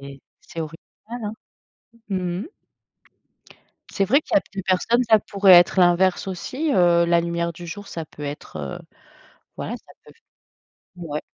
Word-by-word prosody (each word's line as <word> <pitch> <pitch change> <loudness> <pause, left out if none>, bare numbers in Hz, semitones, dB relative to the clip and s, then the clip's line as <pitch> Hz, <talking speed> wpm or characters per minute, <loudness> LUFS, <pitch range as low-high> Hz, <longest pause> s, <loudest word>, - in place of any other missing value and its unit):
c'est 140 0 -10 0.2
c'est 165 - -8
original, 160 +1 -7 0.4
hein. 210 - -3 0.8
Mmh 180 -2 -2
mh. - - -9 1.4
C'est 195 - 0
vrai 270 +10 +4
qu'il - - -5
y - - +8
a - - -4
plus 195 -2 -4
personnes, 210 +7 +2
ça 220 -1 +7
pourrait 200 -1 +4
être 175 +2 +7
l'inverse 180 +2 +3
aussi, 265 - -3
heu, 175 -2 +4
la 170 0 +4
lumière 170 0 -2
du 175 +1 -10
jour, 205 +4 -8
ça 165 -1 -5
peut 150 - -13
être, 145 - -7
heu, 70 -2 -5 0.8
voilà, - - -4
ça - - -15
peut - - -15
f - - -31 0.8
mouais. 155 -4 -5
175 Hz, 170 wpm, -23 LUFS, 170-195 Hz, 1.4 s, y